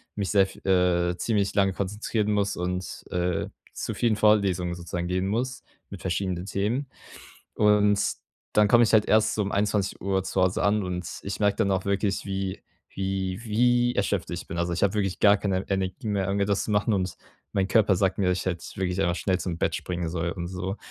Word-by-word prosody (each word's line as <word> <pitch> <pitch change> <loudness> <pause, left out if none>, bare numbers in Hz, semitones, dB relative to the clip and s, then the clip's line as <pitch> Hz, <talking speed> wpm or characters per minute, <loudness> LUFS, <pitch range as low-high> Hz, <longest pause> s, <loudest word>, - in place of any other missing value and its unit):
mich 100 -2 -2
sehr 100 -2 +5
v - - -13
äh, 90 -1 +3
ziemlich 100 0 0
lange 95 -1 +2
konzentrieren 105 +2 -2
muss 100 -1 +1
und, 90 +1 -4
äh, 90 -1 -1 0.3
zu - - -4
vielen 115 -3 +2
Vorlesungen 95 -5 +2
sozusagen 85 0 -4
gehen 90 +1 -1
muss 125 +5 -2 0.3
mit - - -9
verschiedenen 90 -1 -2
Themen. 110 +8 -1 0.7
Und 105 -1 +4 0.5
dann 105 0 +5
komme 120 +1 +6
ich - - 0
halt 110 -2 +5
erst 110 0 +3
so 105 - 0
21:00 100 -1 0
zu 95 - -1
Hause 90 0 +2
an 105 +1 +2
und 90 -1 -3 0.2
ich 100 +2 -5
merke 100 -1 +2
dann 105 -3 +1
auch 95 0 0
wirklich, 100 0 0
wie 95 -1 -3 0.3
wie 95 0 -2
wie 120 +2 +2
erschöpft - - 0
ich - - -5
bin. 85 - -6
Also 85 0 0
ich 85 - -2
habe 100 - +1
wirklich 95 -3 -1
gar 100 0 +6
keine 95 -2 -2
Energie 95 +4 -2
mehr 100 -2 0
irgendwie 100 +1 +1
etwas 100 -1 0
zu - - -4
machen 105 +2 +2
und 95 -3 -1 0.4
mein 95 -1 +1
Körper 100 -2 +3
sagt 95 +1 +1
mir, 90 -2 +2
ich 90 +1 -2
hätte 85 -2 -2
wirklich 95 0 -1
einfach 85 -1 +1
schnell 95 -1 0
zum 85 -3 -3
Bett - - 0
springen 90 -2 -3
soll 85 0 -2
und 85 -2 -5
so. 95 +2 -4
95 Hz, 200 wpm, -26 LUFS, 90-105 Hz, 0.7 s, komme